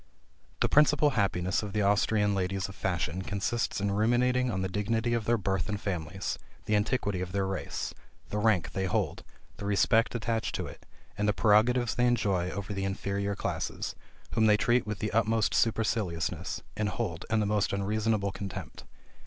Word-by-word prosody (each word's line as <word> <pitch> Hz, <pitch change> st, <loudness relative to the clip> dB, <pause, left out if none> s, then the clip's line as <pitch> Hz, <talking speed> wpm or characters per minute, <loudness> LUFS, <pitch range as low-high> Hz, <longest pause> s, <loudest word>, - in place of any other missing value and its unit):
The -, -, +4 dB
principal 150 Hz, 0 st, +5 dB
happiness 95 Hz, -5 st, +1 dB
of 105 Hz, -2 st, -6 dB
the 105 Hz, -1 st, +1 dB
Austrian 105 Hz, 0 st, +3 dB
ladies 95 Hz, 0 st, -1 dB
of 95 Hz, -, -9 dB
fashion 90 Hz, -2 st, -2 dB
consists 105 Hz, +6 st, -1 dB
in 100 Hz, 0 st, 0 dB
ruminating 125 Hz, +4 st, +2 dB
on 95 Hz, -4 st, -1 dB
the -, -, 0 dB
dignity 110 Hz, +4 st, 0 dB
of 115 Hz, -2 st, 0 dB
their 120 Hz, +2 st, +3 dB
birth 95 Hz, -1 st, -1 dB
and 105 Hz, -1 st, -2 dB
families, 90 Hz, -1 st, -3 dB, 0.3 s
the 105 Hz, -, +1 dB
antiquity 105 Hz, -3 st, 0 dB
of 90 Hz, 0 st, -5 dB
their 100 Hz, -1 st, +1 dB
race, 95 Hz, -1 st, -3 dB, 0.4 s
the 105 Hz, -, -2 dB
rank 105 Hz, -5 st, +2 dB
they 95 Hz, -, -1 dB
hold, 90 Hz, -, -1 dB, 0.3 s
the 100 Hz, -, -6 dB
respect 110 Hz, +4 st, +3 dB
attached 115 Hz, -1 st, -1 dB
to -, -, -2 dB
it, -, -, -11 dB, 0.3 s
and 105 Hz, -, +1 dB
the 105 Hz, -, +3 dB
prerogatives 110 Hz, +4 st, +3 dB
they 125 Hz, 0 st, +2 dB
enjoy 100 Hz, -7 st, +1 dB
over 100 Hz, +2 st, -4 dB
the 95 Hz, 0 st, -2 dB
inferior 100 Hz, +1 st, -2 dB
classes, -, -, -3 dB, 0.4 s
whom 110 Hz, -1 st, +3 dB
they 105 Hz, -1 st, +5 dB
treat 120 Hz, +2 st, +2 dB
with 105 Hz, -1 st, -3 dB
the 110 Hz, -, -2 dB
utmost 110 Hz, 0 st, +2 dB
superciliousness, 90 Hz, -7 st, 0 dB
and 105 Hz, -1 st, 0 dB
hold 90 Hz, -4 st, -3 dB
in 110 Hz, 0 st, +2 dB
the 105 Hz, -, +1 dB
most 105 Hz, -1 st, +1 dB
unreasonable 105 Hz, +1 st, 0 dB
contempt. 100 Hz, -1 st, -7 dB
105 Hz, 180 wpm, -29 LUFS, 95-115 Hz, 0.4 s, principal